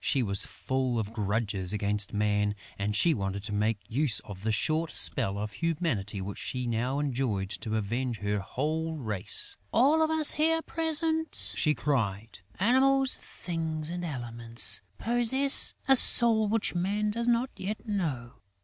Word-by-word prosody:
She 135 Hz, -, +1 dB
was 100 Hz, -3 st, +2 dB
full 130 Hz, -2 st, -2 dB
of 110 Hz, -1 st, -3 dB
grudges 105 Hz, -3 st, -2 dB
against 105 Hz, 0 st, 0 dB
Man 105 Hz, 0 st, 0 dB, 0.2 s
and 105 Hz, +1 st, -1 dB
she 165 Hz, +9 st, +4 dB
wanted 100 Hz, -3 st, -4 dB
to 105 Hz, -, -4 dB
make 105 Hz, +1 st, 0 dB
use 130 Hz, -1 st, +1 dB
of 95 Hz, -2 st, -10 dB
the 110 Hz, +2 st, -1 dB
short 155 Hz, +8 st, 0 dB
spell 95 Hz, +3 st, +2 dB
of 105 Hz, +1 st, -4 dB
humanity 150 Hz, -, -2 dB
which 100 Hz, +1 st, -6 dB
she 125 Hz, -1 st, -3 dB
now 120 Hz, +3 st, -1 dB
enjoyed 125 Hz, -9 st, -2 dB
to 110 Hz, 0 st, -3 dB
avenge 115 Hz, +3 st, -2 dB
her 105 Hz, 0 st, -2 dB
whole 155 Hz, +10 st, -3 dB
race: 110 Hz, -10 st, -2 dB
"All 285 Hz, +7 st, +4 dB
of 315 Hz, -, +2 dB
us 315 Hz, -2 st, +5 dB
here 325 Hz, +1 st, +1 dB
present," 320 Hz, 0 st, 0 dB
she 150 Hz, -2 st, +2 dB
cried, 110 Hz, -8 st, -2 dB, 0.2 s
"Animals, 265 Hz, +5 st, +3 dB
Things 160 Hz, -2 st, -5 dB
and 175 Hz, 0 st, -5 dB
Elements, 120 Hz, -6 st, -3 dB, 0.2 s
possess 240 Hz, +4 st, +4 dB
a 270 Hz, -, +7 dB
soul 230 Hz, -3 st, +6 dB
which 220 Hz, +1 st, 0 dB
Man 205 Hz, +4 st, -1 dB
does 235 Hz, +2 st, -3 dB
not 240 Hz, +2 st, +1 dB
yet 210 Hz, +4 st, -6 dB
know. 140 Hz, -, -3 dB
130 Hz, 155 wpm, -28 LUFS, -, 0.2 s, a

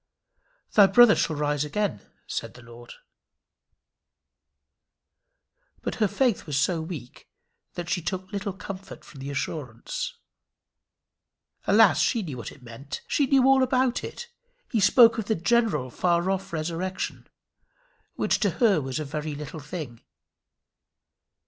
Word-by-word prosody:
"Thy 205 Hz, -2 st, +7 dB
brother 240 Hz, 0 st, +7 dB
shall 160 Hz, -, 0 dB
rise 145 Hz, 0 st, 0 dB
again," 165 Hz, -, -2 dB, 0.2 s
said -, -, -5 dB
the 125 Hz, -, -13 dB
Lord. 120 Hz, 0 st, -12 dB, 2.9 s
But -, -, -2 dB
her 210 Hz, -, +5 dB
faith 205 Hz, -2 st, 0 dB
was 145 Hz, -2 st, -1 dB
so 165 Hz, +3 st, +1 dB
weak 155 Hz, -7 st, -9 dB, 0.5 s
that 175 Hz, -1 st, -5 dB
she 180 Hz, 0 st, -1 dB
took 185 Hz, +2 st, -4 dB
little 200 Hz, 0 st, -3 dB
comfort 195 Hz, +1 st, -9 dB
from 140 Hz, -, -13 dB
the 135 Hz, +1 st, -6 dB
assurance. 145 Hz, -, -4 dB, 1.5 s
Alas! -, -, +6 dB
she 230 Hz, -4 st, +1 dB
knew 145 Hz, -8 st, -6 dB
what 120 Hz, -, -7 dB
it 135 Hz, -, -16 dB
meant. 125 Hz, +4 st, -8 dB
She 285 Hz, -, +1 dB
knew 265 Hz, -1 st, +4 dB
all 270 Hz, 0 st, +5 dB
about 255 Hz, -1 st, +1 dB
it. 480 Hz, -, -7 dB, 0.4 s
He 230 Hz, -, +1 dB
spoke 230 Hz, +4 st, +6 dB
of 220 Hz, -, -3 dB
the 220 Hz, -, 0 dB
general 175 Hz, -, +1 dB
far 175 Hz, +5 st, +1 dB
off 195 Hz, 0 st, -3 dB
resurrection, 170 Hz, +4 st, -4 dB, 0.9 s
which -, -, +1 dB
to 205 Hz, -, +2 dB
her 200 Hz, -8 st, +4 dB
was 130 Hz, +1 st, -3 dB
a 155 Hz, -, -3 dB
very 150 Hz, +1 st, -4 dB
little 150 Hz, +2 st, -7 dB
thing. 145 Hz, -6 st, -7 dB
175 Hz, 135 wpm, -26 LUFS, 145-210 Hz, 2.9 s, Thy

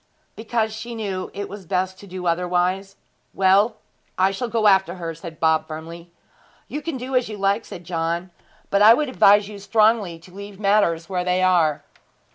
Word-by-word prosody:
'Because 220 Hz, 0 st, -2 dB
she 235 Hz, +2 st, -7 dB
knew 195 Hz, -4 st, -4 dB
it 200 Hz, 0 st, -5 dB
was 195 Hz, -3 st, -10 dB
best 185 Hz, +1 st, -1 dB
to 200 Hz, -, -13 dB
do 185 Hz, -1 st, -7 dB
otherwise.' 180 Hz, +3 st, 0 dB, 0.4 s
'Well, 195 Hz, +4 st, +3 dB, 0.4 s
I 190 Hz, +1 st, +3 dB
shall 240 Hz, +5 st, -3 dB
go 225 Hz, -1 st, -1 dB
after 190 Hz, -3 st, +4 dB
her,' 165 Hz, -2 st, -5 dB
said 165 Hz, 0 st, -10 dB
Bob 160 Hz, -1 st, +2 dB
firmly. 165 Hz, +2 st, -9 dB, 0.6 s
'You 295 Hz, -, -5 dB
can 325 Hz, -3 st, -4 dB
do 255 Hz, +1 st, -5 dB
as 250 Hz, -3 st, +1 dB
you 215 Hz, -, -6 dB
like,' 200 Hz, +3 st, 0 dB
said 175 Hz, -, -10 dB
John; 170 Hz, +1 st, -3 dB, 0.4 s
'but 200 Hz, -, +3 dB
I 220 Hz, +2 st, +9 dB
would 300 Hz, 0 st, -1 dB
advise 205 Hz, -4 st, +5 dB
you 205 Hz, -1 st, -9 dB
strongly 210 Hz, -4 st, +2 dB
to 175 Hz, +2 st, -18 dB
leave 200 Hz, 0 st, -10 dB
matters 195 Hz, -5 st, +2 dB
where 180 Hz, -2 st, -2 dB
they 180 Hz, +1 st, +1 dB
are.' 170 Hz, -5 st, +2 dB
190 Hz, 185 wpm, -22 LUFS, 175-215 Hz, 0.6 s, I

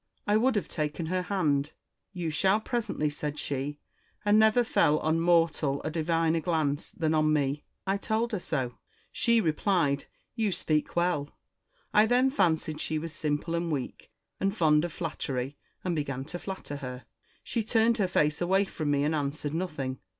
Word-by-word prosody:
I 205 Hz, -, +2 dB
would 245 Hz, +3 st, +3 dB
have 205 Hz, -, 0 dB
taken 155 Hz, +1 st, -3 dB
her 185 Hz, +3 st, 0 dB
hand: 155 Hz, -6 st, 0 dB, 0.2 s
' -, -, -55 dB
You 165 Hz, -2 st, -1 dB
shall 190 Hz, +6 st, +3 dB
presently,' 220 Hz, -, -1 dB
said 150 Hz, 0 st, -4 dB
she: 145 Hz, 0 st, -3 dB, 0.5 s
and 205 Hz, +1 st, +5 dB
never 220 Hz, +3 st, +5 dB
fell 150 Hz, -9 st, +3 dB
on 160 Hz, +1 st, +1 dB
mortal 165 Hz, -4 st, +2 dB
a 155 Hz, -, -2 dB
diviner 165 Hz, 0 st, +1 dB
glance 155 Hz, -4 st, -1 dB
than 160 Hz, -2 st, -1 dB
on 155 Hz, -1 st, +3 dB
me. 145 Hz, -1 st, 0 dB, 0.2 s
I 195 Hz, +1 st, +1 dB
told 220 Hz, +3 st, -1 dB
her 210 Hz, -, -1 dB
so. 130 Hz, -9 st, -3 dB, 0.3 s
She 235 Hz, -1 st, +3 dB
replied, 160 Hz, -5 st, +1 dB, 0.2 s
' -, -, -47 dB
You 220 Hz, -4 st, +1 dB
speak 155 Hz, -3 st, -1 dB
well.' 170 Hz, -5 st, +1 dB, 0.6 s
I 210 Hz, +1 st, +6 dB
then 250 Hz, +3 st, +3 dB
fancied 160 Hz, -, +1 dB
she 155 Hz, -, -1 dB
was 160 Hz, +1 st, -5 dB
simple 155 Hz, +1 st, -2 dB
and 170 Hz, 0 st, -1 dB
weak, 140 Hz, -4 st, -4 dB, 0.3 s
and 195 Hz, +2 st, 0 dB
fond 155 Hz, -3 st, +4 dB
of 175 Hz, -, -4 dB
flattery, 140 Hz, -5 st, -3 dB, 0.3 s
and 180 Hz, -2 st, -1 dB
began 135 Hz, -3 st, -3 dB
to 175 Hz, +4 st, -6 dB
flatter 190 Hz, -7 st, -6 dB
her. 125 Hz, -2 st, -7 dB, 0.4 s
She 230 Hz, -, -1 dB
turned 225 Hz, +1 st, +2 dB
her 195 Hz, -, +3 dB
face 150 Hz, -4 st, +1 dB
away 190 Hz, +3 st, +3 dB
from 155 Hz, -5 st, -3 dB
me 145 Hz, -1 st, +2 dB
and 150 Hz, +2 st, +1 dB
answered 145 Hz, 0 st, -2 dB
nothing. 150 Hz, -7 st, -3 dB
160 Hz, 180 wpm, -29 LUFS, 150-195 Hz, 0.6 s, I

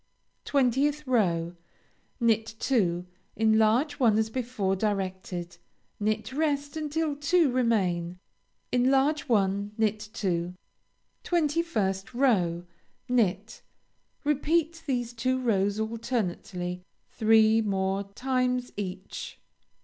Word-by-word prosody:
20th 280 Hz, +2 st, +2 dB
row 175 Hz, -9 st, +1 dB, 0.6 s
Knit 225 Hz, -1 st, +1 dB
two; 180 Hz, -9 st, +1 dB, 0.3 s
enlarge 220 Hz, +6 st, +3 dB
one 225 Hz, -5 st, +4 dB
as 220 Hz, 0 st, 0 dB
before 230 Hz, -6 st, -1 dB
directed; 185 Hz, -3 st, -3 dB, 0.4 s
knit 215 Hz, +3 st, -1 dB
rest 285 Hz, -1 st, -1 dB
until 310 Hz, 0 st, -1 dB
two 295 Hz, +1 st, +2 dB
remain; 185 Hz, -8 st, 0 dB, 0.5 s
enlarge 270 Hz, +4 st, +2 dB
one; 200 Hz, -1 st, +1 dB
knit 215 Hz, -1 st, +1 dB
two. 180 Hz, -5 st, -2 dB, 0.7 s
21st 295 Hz, -, 0 dB
row 180 Hz, -10 st, +2 dB, 0.4 s
Knit. 215 Hz, -4 st, 0 dB, 0.6 s
Repeat 315 Hz, +3 st, +1 dB
these 245 Hz, -3 st, -1 dB
two 255 Hz, +2 st, 0 dB
rows 205 Hz, -4 st, +1 dB
alternately 210 Hz, -5 st, -3 dB, 0.3 s
three 220 Hz, 0 st, +4 dB
more 195 Hz, -1 st, 0 dB
times 250 Hz, 0 st, 0 dB
each. 190 Hz, -1 st, -6 dB
225 Hz, 90 wpm, -27 LUFS, 195-265 Hz, 0.7 s, one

